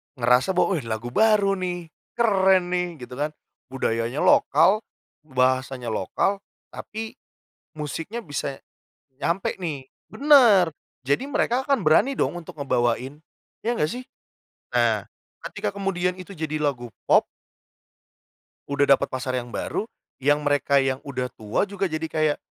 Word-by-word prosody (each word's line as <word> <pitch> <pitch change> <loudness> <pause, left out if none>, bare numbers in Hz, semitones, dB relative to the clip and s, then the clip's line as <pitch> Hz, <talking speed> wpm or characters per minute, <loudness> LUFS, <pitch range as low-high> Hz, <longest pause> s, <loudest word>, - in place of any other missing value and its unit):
ngerasa 125 +8 +3
bahwa, 180 -1 +2
"Eh 120 - -9
lagu 115 +2 -4
baru 210 - +4
nih, 175 -3 -4 0.2
keren 190 -6 +3
nih!" 180 -1 -1
gitu 125 +2 -9
kan. 150 +1 -2 0.3
Budayanya 120 0 -1
lokal, 170 +8 +5 0.5
bahasanya 130 -2 0
lokal, 195 - 0 0.3
tapi 220 +1 -7 0.6
musiknya 165 - -5
bisa 140 -2 -4 0.6
nyampe 175 +7 -1
nih. 150 -8 -5 0.2
Bener. 245 - +6 0.3
Jadi 140 - 0
mereka 265 -2 0
akan 275 -5 +2
berani 180 - +4
dong 175 - -1
untuk 170 - -9
ngebawain, 125 +1 0 0.5
ya 235 - +2
nggak 155 -10 0
sih? 250 +6 -6 0.7
Nah, - - +2 0.5
ketika - - -3
kemudian 185 -2 -1
itu 185 0 -11
jadi 155 -4 -3
lagu 120 -6 -2 0.2
pop - - +6 1.5
udah 140 0 +2
dapat - - -2
pasar 130 0 -2
yang 120 -1 -6
baru, - - -2 0.3
yang 145 +2 +2
mereka 145 -1 +2
yang 135 -1 0
udah 130 -2 -3
tua 110 - 0
juga 200 -1 -2
jadi 160 -2 -2
kayak, 155 -1 +1
155 Hz, 135 wpm, -24 LUFS, 130-195 Hz, 1.5 s, Bener